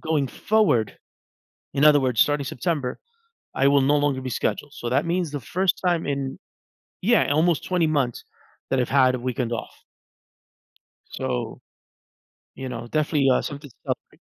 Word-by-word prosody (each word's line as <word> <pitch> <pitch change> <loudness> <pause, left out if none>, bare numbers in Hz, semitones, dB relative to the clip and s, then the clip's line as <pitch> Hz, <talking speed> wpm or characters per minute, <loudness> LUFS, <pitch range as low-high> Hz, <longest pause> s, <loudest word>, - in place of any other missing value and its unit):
going 155 -3 0
forward, 165 - +1 0.8
in 140 +1 +3
other 150 -1 +7
words, 125 -4 0
starting 145 -1 +2
September, 135 -1 -2 0.6
I 135 - +3
will 140 -1 +4
no 145 +2 +3
longer 145 -2 0
be 130 - -4
scheduled. 145 +5 -2
So, 120 - -5
that 125 - +1
means 175 -2 0
the 145 - -4
first 185 +9 0
time 175 -2 +1
in 140 -1 -3 0.6
yeah, 220 -6 +3
almost 160 +1 +2
20 180 -3 +1
months 140 -6 0 0.5
that 135 - +1
I've 125 - 0
had 130 -2 +4
a - - -5
weekend 125 -1 -2
off. 115 - -4 1.4
So, 60 - -4 0.9
you 130 - -6
know, 120 -2 -6
definitely 150 -1 +1
uh 125 - +3
something 145 -2 -7
to - - -25
celebrate. - - -5
140 Hz, 160 wpm, -24 LUFS, 130-155 Hz, 1.4 s, other